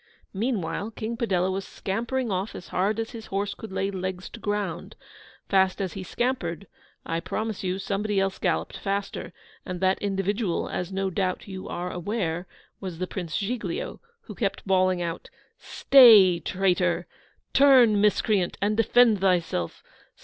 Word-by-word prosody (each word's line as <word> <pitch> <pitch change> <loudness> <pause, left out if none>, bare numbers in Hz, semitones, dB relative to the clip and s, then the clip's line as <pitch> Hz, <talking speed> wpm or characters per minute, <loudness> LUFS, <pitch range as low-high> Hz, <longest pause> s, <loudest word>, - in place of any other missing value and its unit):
Meanwhile 205 -2 -2
King 225 +2 -4
Padella 190 -6 0
was 195 +1 -3
scampering 235 +6 -3
off 190 +3 -2
as 175 - -9
hard 200 +4 0
as 225 - -3
his 225 -2 -9
horse 200 +1 -2
could 220 - -10
lay 195 +1 -1
legs 185 -1 -4
to 235 - -9
ground. 205 -1 -3 0.5
Fast 190 -1 +2
as 190 -3 -2
he 195 - -6
scampered, 200 -4 -2 0.4
I 165 0 -1
promise 215 +4 -4
you 185 0 -1
somebody 200 +1 -1
else 195 0 -1
galloped - - -1
faster; 200 0 -3 0.3
and 180 -1 -5
that 190 +1 +1
individual, 200 -1 -1
as 180 +1 -4
no 195 0 -1
doubt 185 0 -2
you 190 -1 -7
are 180 +1 -4
aware, 180 -2 -3 0.3
was 185 -4 -6
the 185 +1 -3
Royal 180 -4 -3
Giglio, 250 - -3 0.2
who 215 - -10
kept 200 -1 -2
bawling 185 -2 +2
out, 170 0 -5 0.3
'Stay, 215 -10 +7
traitor! 180 -1 0 0.5
Turn, 255 -7 +6
miscreant, 205 -3 +2
and 210 +2 +1
defend 225 -1 +4
thyself! 175 - 0
195 Hz, 150 wpm, -26 LUFS, 185-215 Hz, 0.5 s, Stay